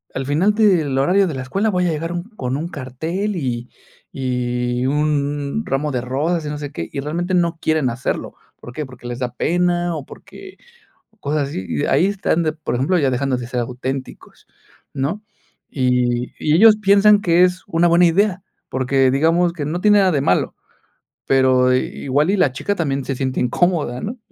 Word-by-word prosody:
al 135 0 -3
final 170 +9 +2
del 175 -11 +2
horario 185 +7 +3
de 160 - -3
la 130 - -4
escuela 195 +12 -1
voy 180 -2 0
a - - +1
llegar 165 +3 -3
un 175 0 -3
con 135 - -5
un 165 +3 -4
cartel 160 +10 -4
y 125 -6 -3 0.4
y 125 -1 -2
un 145 +4 -1
ramo 145 +2 -1
de 125 - -1
rosas, 150 +6 -1
y - - -3
no 150 - -4
sé 145 -1 -6
qué", 85 - -6
y 140 - -4
realmente 175 +5 -3
no 170 -2 +1
quieren 155 -5 +1
hacerlo, 120 +2 -4 0.2
¿por 120 - -10
qué? 150 +1 -4
Porque 125 -1 -11
les 120 +1 -5
da 125 -1 -3
pena 175 0 0
o 145 - -6
porque 390 -1 -13 0.6
o 220 - -33
cosas 145 -4 -2
así. 95 -9 -5
Y 145 - -1
ahí 180 - +3
están 190 -4 0
de 155 - +1
por 155 -5 -4
ejemplo, 165 +9 +1
ya 135 -3 +2
dejando 130 +1 0
de 120 -1 -6
ser 125 -1 -3
auténticos, 130 +2 -6 0.5
¿no? 165 +11 -3 0.5
Y 125 -2 0
y 150 - +1
ellos 215 +3 +7
piensan 205 0 +5
que 175 -1 +4
es 180 0 -2
una 175 -2 +2
buena 170 +1 +5
idea, 190 +2 +1 0.3
porque, 130 0 +2
digamos, 165 +5 +2
que 150 -5 -4
no 175 +4 -3
tiene 210 -1 +5
nada 190 -2 +3
de 140 -3 +1
malo, - - +1 0.7
pero 130 -1 +4
igual 140 +5 0
y - - +2
la 145 -7 +3
chica 205 +9 -2
también 140 -6 -2
se 135 - -3
siente 130 0 -2
incómoda, 145 -1 0
¿no? 240 +4 -5
150 Hz, 195 wpm, -20 LUFS, 130-175 Hz, 0.7 s, ellos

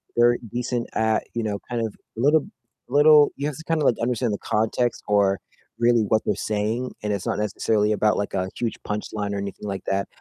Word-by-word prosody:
they're 120 0 +5
decent 120 0 -2
at, 110 0 +1
you 115 - -2
know, 105 -2 -2
kind 120 -2 -1
of 110 - -5 0.2
little 145 +6 +3 0.4
little 145 +1 +6
you 140 - -1
have 150 - -4
to 160 - -9
kind 165 -1 0
of, - - +1
like, 120 - +4
understand 120 -1 0
the 100 - -2
context 110 +2 0
or 100 -2 +3 0.4
really 120 0 +4
what 110 +1 +2
they're 105 - +1
saying, 110 +5 -2
and 105 -1 0
it's 100 - -3
not - - -1
necessarily 105 0 +1
about, 105 0 +2
like, 100 - -2
a 95 -1 -1
huge 115 -2 -2
punchline 105 -1 -3
or - - -2
anything 100 +1 -5
like 95 -1 -4
that. 100 0 0
110 Hz, 210 wpm, -24 LUFS, 105-120 Hz, 0.4 s, little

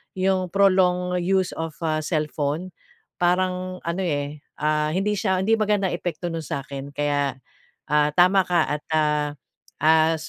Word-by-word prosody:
yung 185 -1 +1
prolong 180 -2 +3
use 185 +1 +1
of 160 -1 -4
a 155 -1 +1
cellphone 155 +2 -2 0.5
parang 185 +1 0
ano, 170 +3 -2
eh, 145 -3 -2 0.2
ah, 150 0 +2
hindi 195 +3 +1
siya 190 -2 0
hindi 225 +3 +3
magandang 205 -3 +1
epekto 175 0 -4
nun 165 - -3
sa'kin. 140 0 -5
Kaya, 145 -2 0 0.6
ah, 150 0 +4
tama 185 +2 +5
ka 175 -3 +3
at, - - -39
ah, 150 -1 +2 0.5
ah, 160 +1 +5
175 Hz, 140 wpm, -24 LUFS, 150-185 Hz, 0.6 s, tama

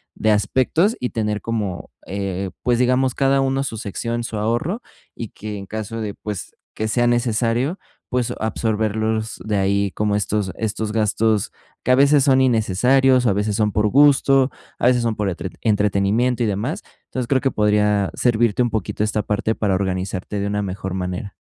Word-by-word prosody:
de 110 - +1
aspectos, 130 - +2
y 125 - -2
tener 105 -2 -1
como, 105 -6 -3 0.2
eh, 95 -1 -3
pues, 120 -1 +2
digamos, 130 0 +2
cada 135 0 +2
uno 135 0 0
su 115 -5 -4
sección, 115 +3 -3
su 110 - -5
ahorro, 120 - -1 0.3
y 115 - -6
que 105 0 -7
en 100 - -7
caso 110 +1 -5
de, 105 -2 -3
pues, 105 -3 -6 0.2
que 110 0 -3
sea 120 +1 +2
necesario, 120 - +1 0.3
pues, 125 -2 -1
absorberlos 110 0 -1
de 105 -2 0
ahí, 100 0 +1
como 105 +1 0
estos 100 -1 -1
estos 110 -1 -2
gastos 110 -1 +1 0.3
que 125 - +1
a - - +7
veces 140 +1 +5
son 130 -2 +4
innecesarios, 125 +3 +3
o - - +4
a - - +3
veces 105 +1 -1
son 105 -1 +1
por 105 +1 +1
gusto, 135 0 +5 0.3
a - - +3
veces 125 -1 +3
son 115 -2 0
por 105 -2 -1
entre 90 +1 -4
entretenimiento, 105 +3 +1
y - - +1
demás, 105 +9 -2 0.2
entonces, 125 -2 -4
creo 135 -1 +2
que 135 - +1
podría 105 -1 +2
servirte 120 -2 +2
un 120 - -1
poquito, 105 0 -2
esta 105 0 0
parte 110 +1 -1
para 100 -3 0
organizarte 95 +1 -2
de 100 - -1
una 105 0 -1
mejor 95 -1 -4
manera. 90 +1 -4
110 Hz, 180 wpm, -21 LUFS, 105-125 Hz, 0.3 s, a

